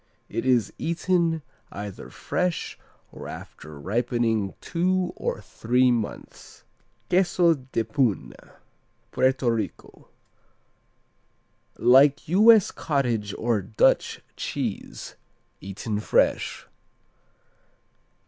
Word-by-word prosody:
It 115 Hz, +4 st, -3 dB
is 125 Hz, -4 st, +2 dB
eaten 170 Hz, -1 st, 0 dB, 0.3 s
either 100 Hz, -1 st, -7 dB
fresh 180 Hz, -2 st, -2 dB, 0.4 s
or -, -, -9 dB
after 75 Hz, -1 st, -10 dB
ripening 115 Hz, -, -1 dB
two 180 Hz, +1 st, 0 dB
or -, -, -3 dB
three 125 Hz, +2 st, +1 dB
months. 115 Hz, -3 st, -5 dB, 0.5 s
Queso 175 Hz, -2 st, +4 dB
de 130 Hz, -5 st, -3 dB
Puna 110 Hz, -1 st, -2 dB, 0.6 s
Puerto 130 Hz, -2 st, +2 dB
Rico 110 Hz, -4 st, -5 dB, 1.7 s
Like 135 Hz, +4 st, +5 dB
U.S. 215 Hz, +3 st, +6 dB
cottage 120 Hz, -9 st, -1 dB
or 115 Hz, -3 st, 0 dB
Dutch 105 Hz, +3 st, +1 dB
cheese, -, -, -5 dB, 0.4 s
eaten 105 Hz, +2 st, -4 dB
fresh. -, -, +1 dB
125 Hz, 80 wpm, -25 LUFS, 110-165 Hz, 1.7 s, U.S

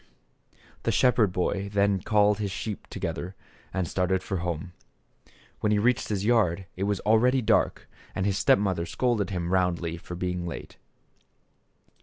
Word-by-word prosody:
The -, -, 0 dB
shepherd 120 Hz, -6 st, +3 dB
boy 95 Hz, +2 st, -1 dB
then 100 Hz, -1 st, +2 dB
called 105 Hz, +1 st, +3 dB
his 105 Hz, -2 st, -1 dB
sheep 105 Hz, +2 st, -5 dB
to -, -, -8 dB
gether 90 Hz, +2 st, -4 dB, 0.4 s
and 95 Hz, -2 st, -1 dB
started 95 Hz, +2 st, 0 dB
for 95 Hz, -, -2 dB
home. 85 Hz, +1 st, -4 dB, 0.9 s
When 105 Hz, -, +1 dB
he 105 Hz, -, +3 dB
reached 120 Hz, +3 st, +2 dB
his 100 Hz, -2 st, -1 dB
yard 100 Hz, -6 st, +2 dB
it 95 Hz, -, -2 dB
was 100 Hz, -1 st, 0 dB
already 125 Hz, +4 st, +3 dB
dark -, -, +1 dB, 0.3 s
and 95 Hz, -, -1 dB
his 100 Hz, -2 st, +1 dB
step -, -, +5 dB
mother 95 Hz, -4 st, -1 dB
scolded 110 Hz, +2 st, 0 dB
him 90 Hz, -2 st, -2 dB
roundly 85 Hz, -2 st, 0 dB
for 90 Hz, +1 st, -8 dB
being 90 Hz, -1 st, -3 dB
late. 85 Hz, -, -7 dB
95 Hz, 160 wpm, -27 LUFS, 90-105 Hz, 0.9 s, step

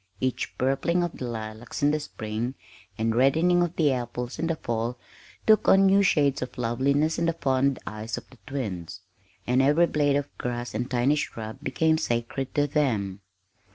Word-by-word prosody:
Each 130 Hz, -1 st, -2 dB
purpling 135 Hz, +7 st, +1 dB
of 175 Hz, -, -4 dB
the 125 Hz, -, -3 dB
lilacs 110 Hz, +2 st, -6 dB
in 145 Hz, -, +5 dB
the 155 Hz, -, 0 dB
spring 115 Hz, -2 st, -4 dB, 0.4 s
and 110 Hz, 0 st, +1 dB
reddening 160 Hz, +8 st, +4 dB
of 175 Hz, -1 st, -1 dB
the 150 Hz, -4 st, +3 dB
apples 125 Hz, 0 st, -4 dB
in 165 Hz, -, 0 dB
the 165 Hz, -, 0 dB
fall 120 Hz, -3 st, -3 dB, 0.5 s
took 215 Hz, -2 st, +5 dB
on 195 Hz, 0 st, +6 dB
new 195 Hz, +1 st, +5 dB
shades 145 Hz, -7 st, +2 dB
of 125 Hz, -, -6 dB
loveliness 140 Hz, +7 st, +1 dB
in 170 Hz, -, +1 dB
the 165 Hz, -, +2 dB
fond 135 Hz, -3 st, +1 dB
eyes 105 Hz, +3 st, -5 dB
of 120 Hz, -, -9 dB
the 130 Hz, -, -17 dB
twins, 95 Hz, -, -5 dB, 0.4 s
and 125 Hz, +2 st, +3 dB
every 150 Hz, +5 st, +4 dB
blade 145 Hz, -3 st, +1 dB
of 145 Hz, 0 st, -2 dB
grass 120 Hz, 0 st, -3 dB
and 120 Hz, +4 st, -2 dB
tiny 125 Hz, +3 st, +2 dB
shrub 110 Hz, -3 st, -5 dB
became 160 Hz, +1 st, +1 dB
sacred 120 Hz, 0 st, -2 dB
to 145 Hz, -, +3 dB
them. 110 Hz, -10 st, 0 dB
130 Hz, 180 wpm, -26 LUFS, 120-150 Hz, 0.5 s, on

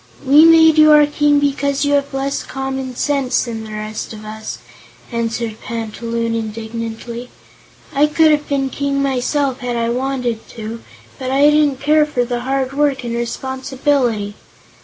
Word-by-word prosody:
"We 290 Hz, +4 st, +7 dB
made 320 Hz, -1 st, +6 dB
you 310 Hz, 0 st, +7 dB
our 300 Hz, 0 st, +7 dB
King 295 Hz, 0 st, +2 dB
because 280 Hz, 0 st, 0 dB
you 285 Hz, -, +1 dB
have 280 Hz, 0 st, +1 dB
less 275 Hz, 0 st, -2 dB
common 265 Hz, -1 st, -5 dB
sense 275 Hz, -1 st, 0 dB
than 225 Hz, -2 st, -5 dB
the 215 Hz, -, -9 dB
rest 215 Hz, +1 st, -5 dB
of 215 Hz, 0 st, -10 dB
us," 215 Hz, 0 st, -6 dB, 0.5 s
answered 230 Hz, -1 st, -3 dB
Panta 230 Hz, 0 st, -6 dB
Loon, 230 Hz, 0 st, -1 dB
indignantly. 230 Hz, +2 st, -5 dB, 0.6 s
"I 290 Hz, +2 st, +4 dB
could 315 Hz, +1 st, +4 dB
have 295 Hz, -1 st, 0 dB
been 270 Hz, -2 st, 0 dB
King 280 Hz, 0 st, -1 dB
myself, 270 Hz, 0 st, 0 dB
had 245 Hz, -2 st, -3 dB
I 230 Hz, 0 st, 0 dB
wanted 250 Hz, -2 st, -2 dB
to, 225 Hz, +1 st, -6 dB, 0.4 s
but 260 Hz, -1 st, -4 dB
I 280 Hz, +3 st, +4 dB
didn't 295 Hz, -3 st, +2 dB
care 300 Hz, +1 st, +3 dB
for 245 Hz, -5 st, -1 dB
the 240 Hz, 0 st, -2 dB
hard 265 Hz, +1 st, -2 dB
work 280 Hz, -2 st, +1 dB
and 235 Hz, -1 st, -4 dB
responsibility." 255 Hz, -2 st, -1 dB
265 Hz, 160 wpm, -18 LUFS, 230-285 Hz, 0.6 s, We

